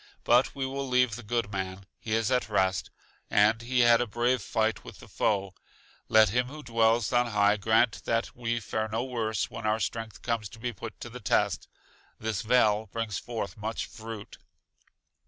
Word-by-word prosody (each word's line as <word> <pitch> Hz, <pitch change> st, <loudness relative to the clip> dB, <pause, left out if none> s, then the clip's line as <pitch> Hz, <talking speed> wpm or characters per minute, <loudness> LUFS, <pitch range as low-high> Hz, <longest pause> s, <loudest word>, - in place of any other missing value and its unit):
But 120 Hz, +2 st, +3 dB
we 135 Hz, -1 st, -2 dB
will 135 Hz, +1 st, -3 dB
leave 125 Hz, -3 st, +3 dB
the 120 Hz, -, -7 dB
good 115 Hz, -1 st, -2 dB
man, 95 Hz, 0 st, -4 dB
he 110 Hz, -, -4 dB
is 115 Hz, +2 st, +1 dB
at 125 Hz, -3 st, +1 dB
rest, 95 Hz, -4 st, +1 dB, 0.4 s
and 105 Hz, +2 st, +4 dB
he 125 Hz, +1 st, +1 dB
had 120 Hz, 0 st, +6 dB
a 120 Hz, -, -1 dB
brave 120 Hz, +3 st, +1 dB
fight 110 Hz, +2 st, 0 dB
with -, -, -11 dB
the -, -, -13 dB
foe; 100 Hz, -2 st, 0 dB, 0.6 s
let 110 Hz, -2 st, +6 dB
Him 125 Hz, +4 st, +1 dB
who 150 Hz, +3 st, -9 dB
dwells 115 Hz, -1 st, +2 dB
on 120 Hz, 0 st, +3 dB
high 105 Hz, -2 st, +3 dB
grant 110 Hz, +2 st, +2 dB
that 115 Hz, 0 st, -1 dB
we 120 Hz, -1 st, -1 dB
fare 110 Hz, 0 st, -2 dB
no 110 Hz, +2 st, -2 dB
worse 115 Hz, -5 st, -2 dB
when 115 Hz, -1 st, -4 dB
our 110 Hz, +1 st, +2 dB
strength 115 Hz, -2 st, -4 dB
comes 115 Hz, -4 st, -1 dB
to 115 Hz, -, -13 dB
be 120 Hz, +1 st, -3 dB
put 110 Hz, +2 st, -8 dB
to 120 Hz, -, -6 dB
the 125 Hz, -, -8 dB
test. 110 Hz, -, +1 dB, 0.5 s
This 110 Hz, -4 st, -2 dB
vale 110 Hz, -2 st, +3 dB
brings 115 Hz, -4 st, -2 dB
forth 120 Hz, -1 st, -5 dB
much 110 Hz, +2 st, -3 dB
fruit. 110 Hz, -2 st, -9 dB
115 Hz, 190 wpm, -28 LUFS, 105-120 Hz, 0.6 s, had